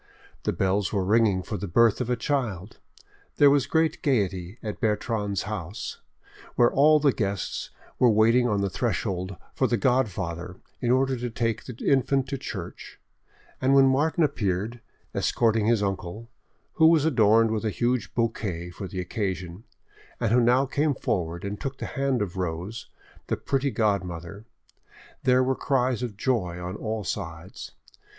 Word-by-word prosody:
The - - +2
bells 95 0 0
were 100 -3 0
ringing 105 -2 +3
for 105 - -4
the 100 - -5
birth 115 +6 +3
of 125 - -2
a 125 - +2
child, 115 -9 -3 0.6
there 145 -1 +7
was 140 -2 +2
great 160 +2 +1
gaiety 95 - 0
at 105 -2 -5
Bertrande's 105 -2 -1
house, 100 -2 -6 0.5
where 120 0 +4
all 150 +2 +5
the 140 -3 +3
guests 100 -4 -3 0.3
were 125 - +6
waiting 115 +3 +4
on 100 -2 +1
the 100 - 0
threshold 95 -5 -2 0.2
for 130 - +1
the 120 - +1
godfather 95 -9 -1 0.2
in 120 - 0
order 130 +1 +3
to 120 +1 -3
take 115 -1 -2
the 125 - -7
infant 135 0 +2
to 135 -2 -3
church, - - -7 0.6
and 135 +1 +4
when 135 -1 +7
Martin 155 +5 +2
appeared, 110 -4 -1 0.3
escorting 110 -2 +1
his 115 -3 +3
uncle, 100 +4 -4 0.4
who 160 -2 +5
was 160 -2 +4
adorned 115 -5 +4
with 110 0 -1
a 110 - +1
huge 120 +3 -1
bouquet 100 -7 -2
for 95 +2 -7
the 90 +1 -6
occasion, 90 0 -4 0.5
and - - 0
who 125 +1 +5
now 125 +3 +4
came 145 +2 0
forward 85 -3 -2
and 100 +1 -5
took 135 -1 -4
the - - -5
hand 135 -4 0
of 95 -2 -6
Rose, 90 +5 -4 0.4
the - - -1
pretty 140 0 0
godmother, 100 -3 -2 0.8
there 130 0 +5
were 130 +1 +1
cries 130 -2 0
of 115 -5 -4
joy 95 -8 -1
on 90 +2 -5
all 110 0 -3
sides. 90 -2 -6
110 Hz, 160 wpm, -26 LUFS, 95-130 Hz, 0.8 s, there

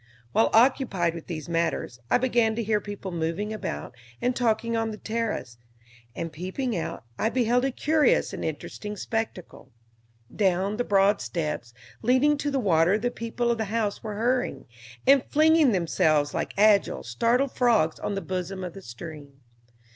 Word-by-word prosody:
While 115 - +3
occupied 225 -8 +3
with 165 -1 -9
these 160 -2 -5
matters 165 -7 -1
I - - +5
began 235 -3 +2
to 230 - -2
hear 210 -1 +1
people 200 -2 -6
moving 170 +6 -2
about 75 - -5 0.3
and 250 0 0
talking 230 -1 +1
on 225 0 0
the 215 - -6
terrace, 215 - -3 0.6
and 165 -1 -5
peeping 195 - -3
out, 165 - -4 0.2
I 220 - +2
beheld 245 +1 +2
a 270 - 0
curious 310 - +2
and - - -5
interesting 210 0 -5
spectacle. 220 - -4 0.7
Down 195 +1 +1
the 245 - +1
broad 200 -1 +3
steps 150 -8 -4 0.3
leading 260 +5 +3
to 290 - -1
the 275 - -1
water 180 -4 +3
the 245 +3 -1
people 235 +1 -2
of 230 - -1
the 220 - 0
house 210 -1 -2
were 215 -2 -5
hurrying, 245 +4 -1 0.4
and 275 -1 +6
flinging 315 -2 +5
themselves 155 -5 +2
like - - -3
agile, 205 -1 +4
startled 235 - +1
frogs 225 -11 +2
on 205 - -3
the 195 - -2
bosom 185 0 -4
of 180 -2 -5
the 195 - -10
stream. 140 +2 -10
210 Hz, 165 wpm, -26 LUFS, 170-240 Hz, 0.7 s, and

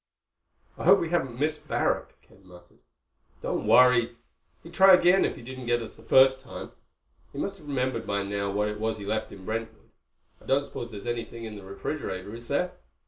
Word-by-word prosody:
"I - - -4
hope 195 +3 +7
we 165 - -2
haven't 135 -9 -1
missed 155 +1 -2
Barrack," - - -1
Ken 95 - -22
muttered. 90 -1 -17 0.6
"Don't - - -2
worry. 120 -2 +5 0.5
He'd 170 - -12
try 190 +1 +8
again 180 +2 +4
if - - -2
he - - -12
didn't 130 0 -8
get 120 0 +2
us 110 - -10
the - - -16
first 130 0 +5
time. 130 - -9 0.6
He - - -11
must 195 0 -3
have 150 - -15
remembered 130 -4 -2
by 100 0 0
now 100 0 -2
what 105 +1 0
it 105 0 -4
was 110 0 -1
he 100 - -8
left 110 +2 -2
in 95 -1 -11
Brentwood. 110 +1 -5 0.5
I - - -18
don't 140 +1 +2
suppose 120 - -7
there's 100 -3 -9
anything 120 -1 -4
in 110 -1 -7
the 100 - -10
refrigerator, 100 -1 -5
is 120 +1 -10
there?" 180 +6 0
120 Hz, 200 wpm, -27 LUFS, 105-140 Hz, 0.6 s, try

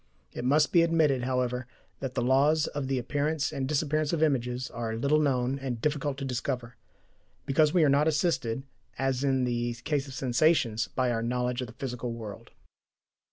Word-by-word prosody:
It - - -5
must 145 +4 +3
be 170 - +6
admitted, 155 -6 +2
however, 125 -1 -1 0.3
that 135 -2 -5
the - - 0
laws 145 +5 +3
of 145 -2 -4
the 135 0 0
appearance 145 +4 -1
and 135 -2 -2
disappearance 155 0 0
of 165 -2 +1
images 125 -4 0
are 115 -1 -3
little 140 +6 +2
known 135 -2 +1
and 130 -3 -4
difficult 145 +1 -1
to 140 - -4
discover, 125 -1 -3 0.7
because 150 +2 +3
we 175 -1 +4
are - - +5
not 140 +2 +3
assisted, 150 -6 0 0.3
as 135 0 0
in 135 -2 +2
the 120 -1 -1
case 140 +4 -2
of 135 - -8
sensations, 125 -3 +2
by 130 -2 0
our 115 -1 -1
knowledge 125 +1 -1
of 125 - -4
the 110 - -12
physical 125 -2 -4
world. 110 -3 -8
135 Hz, 180 wpm, -28 LUFS, 125-150 Hz, 0.7 s, be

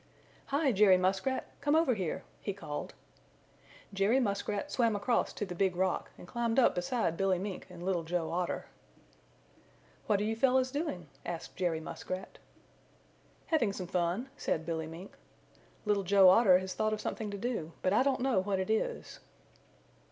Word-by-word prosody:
"Hi, 280 0 +2
Jerry 200 -3 +6
Muskrat! 190 +8 0 0.2
Come 290 +1 +2
over 320 -5 +4
here!" 185 -3 -3 0.2
he 200 - -3
called. 150 -7 -6 1.0
Jerry 200 +6 +3
Muskrat 205 +2 -2
swam 230 -4 +2
across 205 +4 +1
to 205 - -3
the 185 - -6
Big 185 0 +1
Rock 185 0 0
and - - -12
climbed 235 +2 -1
up 260 - +5
beside 180 -1 -1
Billy 190 0 +2
Mink 195 +1 -5
and 175 -1 -10
Little 180 -2 0
Joe 165 0 -2
Otter. 175 +1 -2 1.4
"What 205 -2 +3
are - - 0
you 220 +1 0
fellows 255 +2 +3
doing?" 285 - -3 0.2
asked 170 -1 -6
Jerry 175 -3 0
Muskrat. 185 +3 -6 1.1
"Having 240 -11 +1
some 185 - -5
fun," 180 +7 -1
said 160 - -1
Billy 160 -2 -3
Mink. 170 +5 -10 0.7
"Little 205 -1 +2
Joe 195 0 +6
Otter 190 -2 +7
has 185 0 -4
thought 215 0 0
of 215 - -2
something 215 0 -3
to 200 - -5
do, 200 -8 -3
but 185 - +2
I 215 - +5
don't 265 -1 +1
know 255 -6 +2
what 195 +1 0
it 190 +3 -1
is." 475 - -2
200 Hz, 165 wpm, -32 LUFS, 180-235 Hz, 1.4 s, Otter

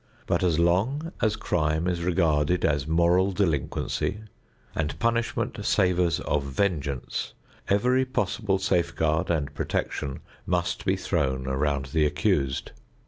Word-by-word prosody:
But - - +1
as 85 -4 +2
long 110 - +1
as 110 -2 +2
crime 80 -3 0
is 90 -2 -1
regarded 85 -2 +2
as 75 -2 +1
moral 85 +4 +3
delinquency 95 +3 -1 0.5
and 75 -1 -2
punishment 115 +4 -1
savors 90 -2 +2
of 75 - 0
vengeance, 70 -2 -2 0.4
every 125 +6 +3
possible 110 -5 0
safeguard 85 -3 0
and 75 -4 -1
protection 70 -1 -3 0.3
must 90 -1 -1
be 95 0 +2
thrown 70 -9 -1
around 70 0 -1
the 80 -2 +4
accused. 75 -4 0
85 Hz, 120 wpm, -26 LUFS, 75-95 Hz, 0.5 s, the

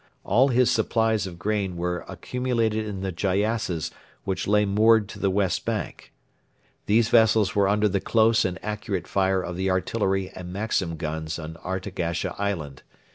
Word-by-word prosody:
All 125 +7 +4
his 125 -1 +3
supplies 110 -3 +1
of 85 -2 -9
grain 100 -1 -2
were 90 +1 -2
accumulated 115 -4 -1
in 100 -2 -5
the 95 -1 -2
gyassas 100 -1 -1 0.3
which 95 - -2
lay 105 +1 +3
moored 110 +1 +4
to - - -9
the 100 - +1
west 95 -2 0
bank. - - -4 0.8
These 110 +2 +3
vessels 110 -3 +4
were 100 -1 +3
under 105 +1 +3
the 100 -1 0
close 115 0 +3
and 90 -1 -2
accurate 105 -4 -3
fire 95 -1 +1
of 90 - -5
the 95 +1 0
artillery 95 0 0
and 90 -1 -8
Maxim 95 -4 -1
guns 80 0 -4
on 80 0 -7
Artagasha 90 -2 -3
island. 80 -10 -3
100 Hz, 160 wpm, -25 LUFS, 90-110 Hz, 0.8 s, All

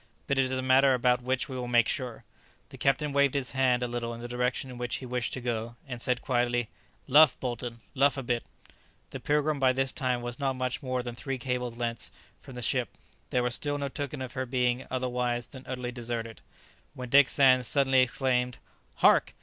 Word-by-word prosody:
But 140 -1 0
it 135 - +4
is 130 - -3
a 130 - -2
matter 130 +1 +5
about 125 0 +2
which 130 +1 -1
we 130 - -7
will 125 -1 -4
make 120 -2 +4
sure." 125 -5 -3 0.5
The - - -11
captain 140 +2 +1
waved 140 -1 +3
his 135 -2 -1
hand 125 -2 +2
a - - 0
little 120 -1 -4
in - - -10
the 120 - -6
direction 125 +1 -2
in 125 - -9
which 120 -1 -2
he 130 - -6
wished 125 -1 -2
to 130 - -3
go, 115 -1 -3
and 125 -3 -6
said 125 0 0
quietly, 120 -2 0 0.4
"Luff, 145 +1 +6
Bolton, 120 -2 -4
luff 140 +1 +3
a 135 - -3
bit!" 120 -1 -1 0.7
The - - -6
"Pilgrim" 150 0 +1
by 130 -1 +4
this 135 0 0
time 125 -2 -1
was 120 0 -5
not 135 -1 0
much 130 -1 -2
more 130 -2 -2
than 120 -1 -5
three 135 +2 -4
cables' 125 -1 -3
lengths 115 -2 -3 0.3
from 135 -3 -12
the 125 - -4
ship, 125 -1 +1 0.4
there 125 - +1
was 125 0 0
still 145 +2 0
no 140 -1 -3
token 140 -1 -5
of 130 - -7
her 130 -1 -3
being 125 0 0
otherwise 125 -2 -1
than 130 -1 -12
utterly 125 -1 -4
deserted, 115 -2 -5 0.5
when 125 -1 -7
Dick 140 +1 +6
Sands 130 -3 +5
suddenly 135 -2 +3
exclaimed, 125 -1 0 0.5
"Hark! - - +5
125 Hz, 215 wpm, -28 LUFS, 120-135 Hz, 0.7 s, Luff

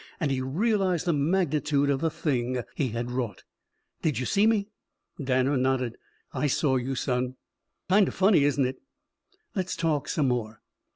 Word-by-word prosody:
And 150 -6 0
he 130 -1 0
realized 185 - +1
the 170 - +2
magnitude 150 -2 +1
of 135 0 0
the 165 - +2
thing 125 -5 -1
he 140 - 0
had 120 +1 -4
wrought. 125 -4 -3 0.6
"Did 155 -4 0
you 130 - -1
see 205 - +3
me?" 210 -3 +2 0.6
Danner 130 +1 +2
nodded. 130 -2 0 0.4
"I 145 +2 0
saw 135 -1 +2
you, 130 +2 -2
son." 125 -1 -1 0.5
"Kind 195 +1 +5
of - - -5
funny, 190 -5 +4
isn't 145 -1 +2
it?" 130 - -3 0.8
"Let's 185 -2 -2
talk 160 -4 0
some 145 -5 +1
more." 110 -3 -3
140 Hz, 165 wpm, -27 LUFS, 130-170 Hz, 0.8 s, Kind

